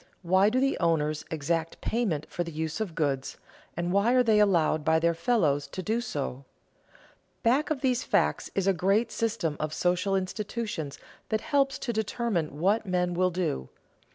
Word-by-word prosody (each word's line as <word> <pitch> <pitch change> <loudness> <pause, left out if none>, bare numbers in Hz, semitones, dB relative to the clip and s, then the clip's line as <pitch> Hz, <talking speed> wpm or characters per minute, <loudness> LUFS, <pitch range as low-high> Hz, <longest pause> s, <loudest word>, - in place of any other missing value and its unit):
Why 190 +4 +4
do 250 +4 +1
the 275 +1 +1
owners 155 -2 +1
exact 160 +1 -2
payment 200 -11 -1
for 175 - -3
the 170 - -7
use 160 +5 -3
of 185 -7 -3
goods, 140 -4 -1 0.4
and 175 0 -1
why 205 +5 +3
are 250 - +5
they 220 -3 +4
allowed 170 -6 +3
by 160 +1 +3
their 170 +1 +2
fellows 165 - +1
to 185 - -6
do 225 +4 0
so? 140 - -4 1.0
Back 255 +6 +3
of 300 -4 -1
these 255 -2 +1
facts - - +1
is 195 - +1
a 195 - +4
great 195 +6 +1
system 215 -10 -1
of 155 0 -3
social 180 +2 +1
institutions 195 -5 -3 0.3
that 220 -1 0
helps 275 -1 +1
to 240 - -3
determine 215 - -1
what 205 +5 +2
men 180 -1 0
will 185 +1 +2
do. 170 - -2
185 Hz, 175 wpm, -28 LUFS, 160-220 Hz, 1.0 s, are